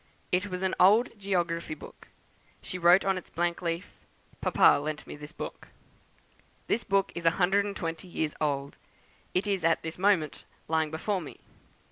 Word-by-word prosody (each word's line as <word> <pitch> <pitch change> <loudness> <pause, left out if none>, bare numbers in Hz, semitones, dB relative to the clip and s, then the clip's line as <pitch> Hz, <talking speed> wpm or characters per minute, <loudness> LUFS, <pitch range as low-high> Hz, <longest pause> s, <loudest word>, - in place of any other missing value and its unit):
It 185 +3 +1
was 185 -1 -4
an 190 - +1
old 215 +7 +6
geography 175 -5 -1
book; - - -13 0.5
she 185 - -6
wrote 175 +3 +6
on 190 -1 +1
its - - -17
blank 170 0 -1
leaf, 170 0 -4 0.4
'Papa - - +5
lent 150 0 -4
me - - -8
this 150 +1 -10
book.' - - -7 1.0
This 235 - 0
book 195 0 +1
is 170 -1 -2
a 165 - +3
hundred 195 +2 +3
and 200 -1 -4
twenty 165 +1 -4
years 160 -3 -2
old; 140 -2 -1 0.6
it 185 - +2
is 195 -3 0
at 165 0 +2
this 160 +2 -6
moment 185 -6 +2 0.2
lying 160 -1 +1
before 185 +5 -2
me. 155 - -10
175 Hz, 170 wpm, -29 LUFS, 160-190 Hz, 1.0 s, old